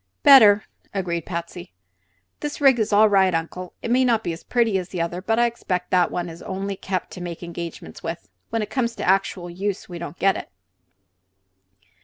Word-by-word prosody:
"Better," 215 -8 +8 0.3
agreed 170 -3 -2
Patsy. 170 - -6 0.7
"This 295 -1 -4
rig 270 -4 +5
is 220 - 0
all 210 +1 +6
right, 190 -3 +3
Uncle. 175 +2 -4
It 230 - -2
may 255 +1 +4
not 230 -3 +2
be 170 - -2
as 165 - -10
pretty 230 -5 +1
as 180 0 -7
the 180 - -5
other, 170 +2 -2
but 225 +4 0
I 240 - +4
expect 185 -6 -3
that 180 -2 +4
one 175 0 -3
is 165 0 -10
only 195 +1 -4
kept 185 -1 -4
to 180 - -8
make 175 -1 -6
engagements 170 - -7
with. 95 - -6 0.2
When 225 -1 -1
it 210 - -8
comes 235 -3 -1
to - - -4
actual 190 -1 +1
use, 190 +3 -4
we 175 -2 -8
don't 170 0 -7
get 195 +1 +3
it." - - -7
190 Hz, 200 wpm, -23 LUFS, 175-220 Hz, 0.7 s, Better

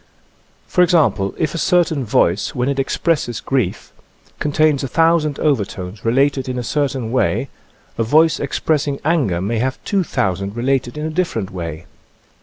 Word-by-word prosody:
For 180 - +1
example, 155 - +2
if 155 - -1
a 165 - -3
certain 170 -6 +2
voice, 100 -3 +1
when 125 +2 0
it 140 -1 -1
ex 135 - -1
presses 140 - 0
grief, 125 -9 -2 0.5
contains 150 -1 +2
1,000 155 +1 +2
overtones 100 -8 -2
related 135 +2 +1
in 125 - -3
a 125 - -2
certain 135 -4 -1
way, 130 +1 0 0.5
a - - +3
voice 155 +7 +3
expressing 145 -3 -1
anger 140 - +1
may 110 +4 -1
have 130 +2 -1
2,000 100 - -1
related 130 +2 -1
in 150 - -3
a 160 - -3
different 155 - -2
way. 85 -3 -6
135 Hz, 150 wpm, -19 LUFS, 110-155 Hz, 0.5 s, a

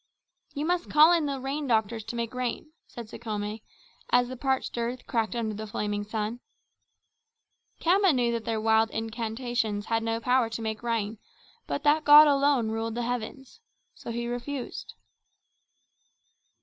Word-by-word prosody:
"You 290 +2 -2
must 350 +1 -1
call 310 +3 +7
in 325 -4 +2
the 275 -1 -3
rain 275 +2 -3
doctors 220 -1 +1
to - - -6
make 235 0 -3
rain," 250 +4 -3 0.2
said 235 -2 -9
Sekhome, 215 -1 -5 0.5
as 245 0 +3
the 255 - -5
parched 265 +1 -1
earth 240 +2 -3
cracked 225 0 -1
under 225 -2 -2
the 215 +1 -6
flaming 205 0 -2
sun. 220 +2 -3 1.4
Khama 380 +2 +4
knew 245 -4 +1
that 230 -1 -2
their 225 -1 -2
wild 220 0 +3
incantations 225 -1 -3
had 225 0 0
no 225 0 -1
power 250 0 +2
to 225 - -5
make 220 -1 -3
rain, 225 -2 -2 0.5
but 285 - -3
that 300 +1 +3
God 300 +1 +9
alone 280 -5 +2
ruled 225 0 -3
the 240 - -2
heavens. 245 - -5 0.3
So - - -10
he 235 +1 -3
refused. 245 +2 -5
235 Hz, 155 wpm, -27 LUFS, 220-270 Hz, 1.4 s, God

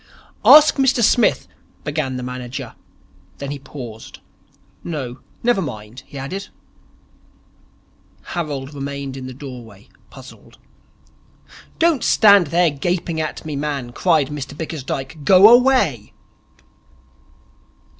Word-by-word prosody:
'Ask 305 0 +8
Mr 260 -3 +2
Smith 235 +1 +3 0.2
' - - -35
began 145 -3 -3
the 125 - -5
manager. 125 0 -6 0.6
Then 140 0 -6
he 145 - -6
paused. 125 -5 -10 0.7
'No, 130 -7 -5 0.2
never 240 -4 +2
mind,' 115 - -7
he 140 - -11
added. 185 +9 -6 1.8
Harold 145 -4 -5
remained 140 -1 -6
in 130 -1 -7
the - - -7
doorway, 120 -6 -11 0.2
puzzled. - - -15 1.2
'Don't 330 -6 +2
stand 200 -5 +5
there 170 +2 +2
gaping 165 +2 -2
at 155 - -5
me, 155 -2 -4
man,' 140 -4 -3
cried 155 -1 +1
Mr 145 -1 -7
Bickersdyke, 150 -2 -5
'Go 190 +5 +7
away.' 255 +2 +3
145 Hz, 110 wpm, -20 LUFS, 130-180 Hz, 1.8 s, Ask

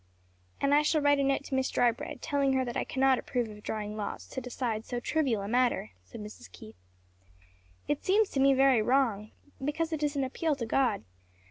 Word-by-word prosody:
"And 280 0 +2
I 295 - +6
shall 305 +1 +2
write 285 -1 +3
a - - +2
note 275 0 +1
to 280 - -8
Miss 265 0 +1
Drybread, 240 -1 0
telling 280 -3 +1
her 260 -1 +1
that 240 - -5
I - - 0
cannot 265 -1 +2
approve 245 -4 -2
of 210 0 -12
drawing 210 0 -4
lots 210 -1 -5
to 260 - -5
decide 235 -3 -3
so 245 0 -4
trivial 250 -7 0
a - - -4
matter;" 240 - +1
said 90 - -10
Mrs. 210 0 -10
Keith. 110 -4 -13 1.1
"It 295 - -1
seems 410 +2 +3
to 275 - -1
me 270 0 +5
very 265 -3 +5
wrong; 225 -4 +1 0.3
because 320 +3 -1
it 310 - -2
is 295 -1 0
an 275 - 0
appeal 295 +4 -1
to 245 -4 -4
God. 250 - +1
265 Hz, 210 wpm, -29 LUFS, 225-285 Hz, 1.1 s, I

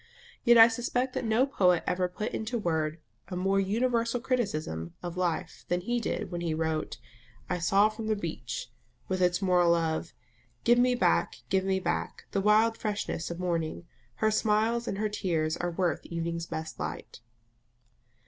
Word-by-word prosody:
Yet 240 0 +6
I 225 0 +10
suspect 245 +2 -1
that - - -2
no 225 +4 +3
poet 180 -10 +3
ever 180 0 +1
put 180 +4 -4
into 225 +2 -2
words 160 -6 -1 0.3
a 185 - -5
more 195 +2 +1
universal 230 +4 +1
criticism 155 - -2
of 175 -1 -5
life 175 -1 -2
than 180 0 0
he 240 +6 -1
did 210 -3 -3
when 175 -1 -3
he 165 -2 -1
wrote 160 -4 -2 0.5
"I 180 - 0
saw 195 +5 +4
from 215 0 -6
the 215 - +2
beach," 160 - -5 0.4
with 185 -1 -1
its 180 +2 +2
moral 175 -2 +4
of 165 0 -1 0.5
"Give 240 +1 +5
me 250 0 +4
back, 85 - +2
give 190 0 +2
me 190 0 +1
back, - - -3
the 195 - 0
wild 215 +2 +4
freshness 205 -5 -2
of 170 - -5
morning 170 -2 -2 0.3
Her 215 - +1
smiles 220 +2 +1
and 195 - -2
her 215 +1 0
tears 165 -6 -1
are 175 - -1
worth 175 0 -1
evening's 170 0 -3
best 160 0 -6
light." - - -6
185 Hz, 170 wpm, -29 LUFS, 170-220 Hz, 0.5 s, I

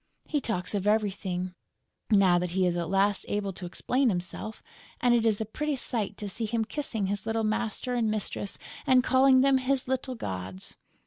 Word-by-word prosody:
He 295 -2 -1
talks 180 -7 -2
of 205 -1 -1
everything, 195 -4 0 0.6
now 195 -5 +5
that 180 0 -2
he 185 - +4
is 175 -1 +1
at 170 -1 -2
last 195 +1 +2
able 205 -1 -1
to 180 0 -7
explain 250 +8 +1
himself; 190 +3 -4 0.4
and 245 0 +4
it 230 -1 +3
is 215 -2 +2
a 220 - -1
pretty 300 +7 -2
sight 220 -5 -3
to 210 - -5
see 220 +3 -3
him 225 0 0
kissing 225 -5 -2
his 200 +3 -2
little 225 0 0
master 225 +3 -1
and 235 -3 +1
mistress 210 -1 -3 0.3
and 255 -1 +5
calling 260 +1 +5
them 270 0 +4
"his 260 0 0
little 260 0 -2
gods!" 95 - -6
215 Hz, 190 wpm, -28 LUFS, 195-250 Hz, 0.6 s, now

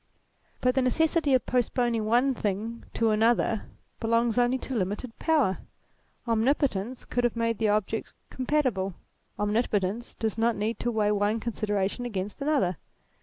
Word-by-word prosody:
But 250 0 +3
the 265 - +2
necessity 305 +2 +2
of 255 - +1
postponing 240 -2 +1
one 245 +5 +3
thing 220 +1 -3
to 225 -1 +2
another 225 0 +2 0.3
belongs 230 +1 +2
only 245 +1 +3
to 260 - -6
limited 215 +3 -2
power. 295 - +2 0.7
Omnipotence 235 -1 0
could 245 - -1
have 240 -1 +1
made 230 -1 0
the 220 -2 +2
objects 215 +1 -1 0.2
compatible. 255 - 0 0.4
Omnipotence 210 0 0
does 220 -1 -2
not 230 0 +2
need 220 +3 -2
to 240 - -1
weigh 215 -3 +1
one 210 +2 +1
considera 210 -4 -1
tion 245 +5 -6
against 205 +3 -5
another. 275 - +1
230 Hz, 145 wpm, -27 LUFS, 210-250 Hz, 0.7 s, But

